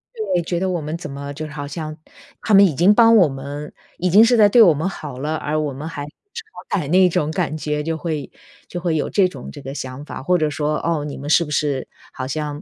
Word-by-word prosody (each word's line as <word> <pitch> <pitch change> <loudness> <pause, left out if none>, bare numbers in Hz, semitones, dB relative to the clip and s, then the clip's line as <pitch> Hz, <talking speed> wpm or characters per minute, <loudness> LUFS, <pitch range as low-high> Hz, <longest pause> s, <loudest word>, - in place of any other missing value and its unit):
对， 430 - -1
觉 170 +1 -2
得 190 +1 -1
我 175 -3 -2
们 155 +2 -4
怎 170 - -8
么 140 +1 -6
就 155 +2 -6
好 145 -1 -6
像 155 0 -6 0.5
他 220 - 0
们 200 0 +8
已 165 -7 0
经 180 +8 +5
帮 230 0 +6
我 190 -7 +6
们 140 +2 -7 0.2
已 180 - 0
经 205 +6 +7
是 235 +2 +4
在 205 -2 +6
对 235 +2 +6
我 175 -7 +7
们 155 +5 -2
好 145 -8 -8
了， 150 +3 -2
而 155 0 -2
我 150 -2 -2
们 145 +4 -7
还 145 -3 -6
不 - - -10 0.2
识 460 -1 -6
好 205 - -3
歹 145 - -4
那 185 +2 +5
种 155 -2 0
感 170 -3 -2
觉， 150 -1 -2
就 160 +1 -2
会 155 -4 -4 0.4
就 175 - -5
会 170 -2 0
有 155 - -1
这 195 -3 +3
种 140 -9 -9
这 145 - -10
个 135 +1 -7
想 130 0 -6
法。 - - -7
或 180 +6 +2
者 155 -2 +1
说： 150 0 -1
“哦， 160 -3 0
你 145 - -6
们 145 - -6
是 170 +2 +4
不 150 - -9
是 145 -3 -1 0.2
好 130 -3 -5
像 150 +1 -4
155 Hz, 285 characters per minute, -20 LUFS, 145-180 Hz, 0.5 s, 们